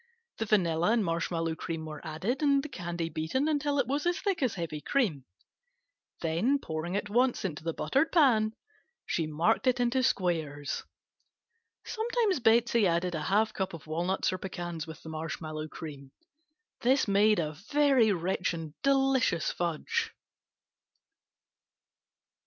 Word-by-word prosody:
The 225 - 0
vanilla 175 -1 +2
and 225 -4 +2
marshmallow 165 -1 -1
cream 160 0 -4
were 155 -1 -7
added 180 - -2
and 280 -2 +3
the 300 - -6
candy 175 -6 -4
beaten 165 - -1
until 290 -2 0
it 275 - +2
was 285 +6 -1
as 350 - +1
thick 395 -6 -1
as 255 -4 +1
heavy 165 -4 -4
cream, 170 - 0 1.0
then 175 - +2
pouring 165 - -4
at 205 - -3
once 240 +1 +1
into 155 -4 -4
the 165 - -1
buttered 280 +5 +1
pan 230 -10 +4 0.5
she 165 -2 -1
marked 170 - +1
it 255 -1 +3
into 245 +2 +2
squares. 160 - -1 1.0
Sometimes 445 - 0
Betsey 235 -2 +4
added 175 +1 0
a 155 - -2
half 215 +6 +2
cup 190 -2 -3
of 160 - -12
walnuts 175 +5 0
or 185 - -4
pecans 175 -4 -5
with 160 - -10
the 160 - -8
marshmallow 155 0 -5
cream. 145 -4 -9 0.7
This 260 +1 +3
made 205 +2 +4
a 155 -3 -1
very 255 - +3
rich 180 -1 -1
and 160 -2 -7
delicious 270 - +2
fudge. 170 -3 -2
190 Hz, 145 wpm, -29 LUFS, 160-255 Hz, 1.0 s, pan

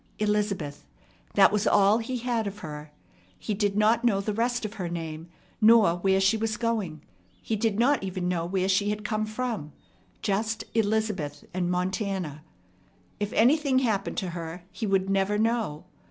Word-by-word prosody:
Elizabeth 205 - -1 0.5
that - - +7
was 210 +1 +1
all 205 +2 +5
he 250 +2 -3
had 235 -3 -1
of 200 +1 -6
her. 150 0 -7 0.5
He 210 - -3
did 205 0 0
not 220 +3 +3
know 220 -5 +3
the 205 +2 -2
rest 235 +1 0
of 210 - -5
her 175 - -2
name, 165 -1 -6 0.3
nor 215 -6 +6
where 190 +1 +2
she 195 +3 +3
was 220 -1 -1
going. 215 -10 -2 0.4
He 225 - -2
did 215 -1 0
not 265 +5 +3
even 185 -2 -3
know 175 -2 0
where 185 +1 0
she 195 +2 +2
had 210 0 -3
come 215 -1 -1
from, 215 - -4 0.5
just 215 +2 -1
"Elizabeth" 210 -9 -1
and 180 -1 -1
"Montana." 180 -4 -2 0.8
If 205 0 -2
anything 275 +3 +3
happened 220 -6 0
lo 185 - -3
her, 170 0 -6
he 220 - -4
would 195 -1 +2
never 195 +1 +1
know. 220 -8 0
205 Hz, 170 wpm, -27 LUFS, 180-220 Hz, 0.8 s, that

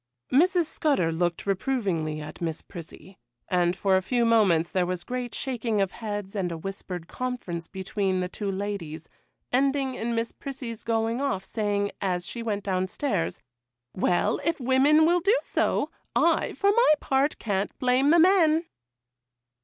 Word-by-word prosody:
Mrs. 345 +5 +4
Scudder 280 - +1
looked 170 +1 -1
reprovingly 190 -7 -1
at 150 +3 -9
Miss 165 -2 -3
Prissy, 175 +1 -11 0.3
and 175 -1 +2
for 190 0 +2
a 190 - +3
few 240 +5 +1
moments 195 -8 +3
there 180 -2 +1
was 180 -1 -3
great 245 -2 -4
shaking 235 -5 -2
of 195 -1 +1
heads 205 -3 -5
and 185 -3 -1
a 165 - -4
whispered 180 -1 -6
conference 220 -10 -4
between 190 0 -2
the 180 - -1
two 200 +2 -4
ladies, 190 -6 -5 0.4
ending 270 +1 +1
in 235 -1 -2
Miss 230 0 -1
Prissy's 255 -5 -7
going 225 +2 0
off, 195 -9 -1
saying, 205 -1 -1
as 180 -2 -1
she 235 - -5
went 210 -3 -2
down 185 -1 0
stairs,— 195 - -2 0.5
'Well, 190 +3 +1
if 330 0 0
women 270 +5 +4
will 350 +2 +4
do 400 +7 +3
so, - - 0 0.2
I, - - +2
for 400 0 +2
my 470 -6 +5
part, 275 +2 +1
can't 200 -2 -2
blame 255 +2 +3
the 335 - +6
men. 335 -2 +5
210 Hz, 160 wpm, -26 LUFS, 185-265 Hz, 0.5 s, the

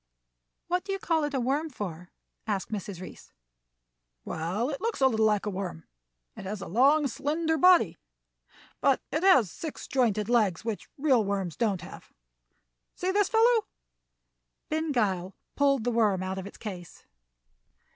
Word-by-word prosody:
"What 360 +1 -1
do 400 - -5
you 390 - -1
call 330 -4 0
it 295 - -4
a - - +1
worm 280 +6 0
for?" 180 - -7 0.4
asked 200 -1 -2
Mrs. 200 -3 -5
Reece. 185 - -11 0.9
"Well, 185 - -2
it 275 - -5
looks 460 0 -2
a 265 - +4
little 220 -4 +3
like 210 -1 +1
a 210 - -1
worm. 185 -4 -5 0.5
It - - -9
has 205 +2 -4
a - - -6
long, 280 - +4
slender 315 +5 -1
body, 360 +3 +5 0.8
but - - +3
it 310 - 0
has 310 - +5
six 315 -3 -7
jointed 215 -6 +1
legs, 220 -6 +2
which 225 -3 -4
real 270 -6 +3
worms 195 -4 -2
don't 205 -7 0
have. 175 - -11 0.8
See 365 +1 -1
this 405 0 +2
fellow!" 455 0 +4 1.0
Ben 315 0 -1
Gile 195 -7 0 0.2
pulled 275 -4 +2
the 245 - 0
worm 210 -5 +2
out 190 +1 -3
of 190 - -6
its - - -12
case. 180 -5 -9
235 Hz, 160 wpm, -28 LUFS, 195-310 Hz, 1.0 s, body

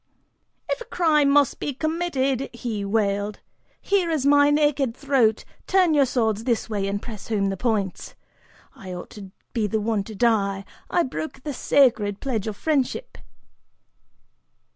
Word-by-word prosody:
"If - - -2
a - - -6
crime 305 -5 +2
must 285 -1 +3
be 285 - -3
committed," 280 -4 -1
he 230 -4 -4
wailed, 205 0 -1 0.4
"here 390 -4 +1
is 310 -5 0
my 285 0 +5
naked 290 -4 +1
throat, 260 -6 +2 0.2
turn 370 -4 +3
your 280 -3 +4
swords 220 -4 0
this 235 -2 0
way 205 -3 -2
and 200 +1 -2
press 215 -2 -9
home 200 -3 0
the 195 - -2
points. 205 -3 -2 0.6
I 185 -1 -8
ought 175 - -9
to 200 -2 -10 0.2
be 220 -3 0
the 220 +2 -1
one 215 -1 0
to 220 - -9
die, 200 -3 +1 0.2
I 345 - +2
broke 270 -1 -6
the 295 - -4
sacred 230 -7 +2
pledge 230 -7 -2
of 210 -2 -4
friendship." 290 -5 -1
235 Hz, 155 wpm, -24 LUFS, 205-285 Hz, 0.6 s, my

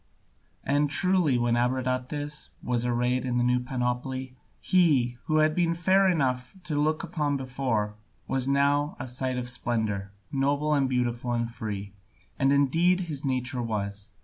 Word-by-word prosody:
And 145 +1 +1
truly, 180 -5 +3
when 120 0 +1
Abradatas 130 +4 -1
was 120 -1 0
arrayed 125 +1 +1
in 125 -1 -1
the 120 - +2
new 125 0 +3
panoply, 125 +1 -3 0.2
he, 135 -10 +2
who 155 - 0
had 155 0 +4
been 170 0 +1
fair 190 +3 +4
enough 130 -4 0
to 150 -1 -3
look 155 +2 +1
upon 150 -4 -1
before, 125 -5 -1 0.3
was 130 -1 0
now 140 +2 +2
a - - -4
sight 130 +1 -2
of 125 -1 -3
splendour, 110 -5 -2 0.2
noble 140 +2 +1
and 140 -3 +2
beautiful 120 -1 -1
and 115 -1 0
free, 105 -4 -6 0.5
as 135 -1 +3
indeed 165 +6 +3
his 155 -6 -4
nature 130 -2 0
was. 100 -2 -4
130 Hz, 150 wpm, -27 LUFS, 120-145 Hz, 0.5 s, had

